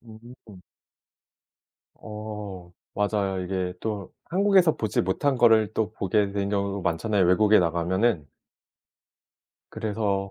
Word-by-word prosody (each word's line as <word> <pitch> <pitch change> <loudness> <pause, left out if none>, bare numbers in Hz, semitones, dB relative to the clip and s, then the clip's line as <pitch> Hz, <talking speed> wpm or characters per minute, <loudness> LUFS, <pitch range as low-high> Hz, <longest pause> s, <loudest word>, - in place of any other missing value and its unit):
무섭죠. 110 -4 -15 1.4
어 105 -4 -8 0.2
맞아요. 100 -2 -1
이게 90 0 -3
또 105 -4 -5
한국에서 190 -2 +3
보지 110 -4 -1
못한 130 +9 0
거를 110 -3 +4
또 110 -1 -1
보게 100 0 0
된 100 0 -2
경우도 100 -1 -2
많잖아요 90 +4 +1
외국에 105 +4 +5
나가면은. 90 +1 0 1.4
그래서 100 -2 -2
105 Hz, 240 characters per minute, -25 LUFS, 95-110 Hz, 1.4 s, 외국에